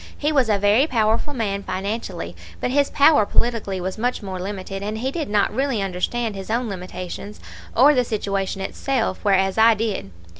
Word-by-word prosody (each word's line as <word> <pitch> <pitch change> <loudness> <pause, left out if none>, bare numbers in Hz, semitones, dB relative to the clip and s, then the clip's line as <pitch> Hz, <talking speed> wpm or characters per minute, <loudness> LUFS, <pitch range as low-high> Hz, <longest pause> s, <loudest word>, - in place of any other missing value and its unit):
He 300 +1 0
was 265 -6 +2
a 210 - +3
very 205 +8 +4
powerful 225 +1 +1
man 210 -7 -2
financially, 190 - -4 0.2
but - - -1
his 280 +1 +2
power 285 -4 +5
politically 210 -3 0
was 185 +3 -4
much 245 -1 -1
more 190 -2 -5
limited, 195 0 -5
and 210 +2 -3
he 260 +4 -2
did 310 -4 -3
not 205 -1 +2
really 270 -4 0
understand 200 +4 -1
his 195 0 -7
own 235 +2 0
limitations 185 +2 -7 0.4
or 280 +5 +7
the 250 -3 +3
situation 195 -4 -2
itself, 230 +1 -1
whereas 195 0 +2
I 225 0 +7
did. 210 - -2
215 Hz, 180 wpm, -22 LUFS, 195-245 Hz, 0.4 s, or